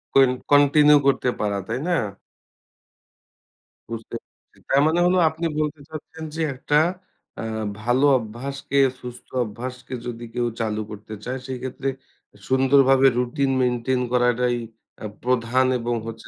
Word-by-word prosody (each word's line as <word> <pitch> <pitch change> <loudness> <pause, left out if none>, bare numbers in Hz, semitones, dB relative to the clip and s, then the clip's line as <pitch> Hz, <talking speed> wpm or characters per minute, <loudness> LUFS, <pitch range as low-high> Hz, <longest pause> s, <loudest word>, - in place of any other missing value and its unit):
Coin 135 -2 +6 0.2
continue 145 +1 +6
করতে 130 -2 +2
পারা, 100 -1 0
তাই 115 +3 -2
না? - - 0 2.0
বুঝতে, 115 -1 -6 0.5
তার 135 - +4
মানে 165 +2 +2
হলো 180 +1 +3
আপনি 165 +2 -5
বলতে 150 0 -2
চাচ্ছেন 160 +1 -9
যে 165 - -2
একটা 145 +3 -1 0.7
আ - - -5 0.4
ভালো 125 +5 +2
অভ্যাসকে 135 +5 -5 0.2
সুস্থ 125 -1 -9 0.2
অভ্যাসকে 125 +4 -8
যদি 120 0 -6
কেউ 120 -1 0
চালু 110 -1 -1
করতে 105 +1 -9
চায় 130 +1 -3
সেক্ষেত্রে 130 +1 -5 0.6
সুন্দরভাবে 135 0 +5
রুটিন 135 +3 0
মেইনটেইন 125 +1 0
করাটাই 125 0 +2 0.4
অ্যা 105 - -6 0.2
প্রধান 125 +1 +2
এবং 120 0 -1
হচ্ছে 115 0 -8
125 Hz, 125 wpm, -23 LUFS, 120-140 Hz, 2.0 s, Coin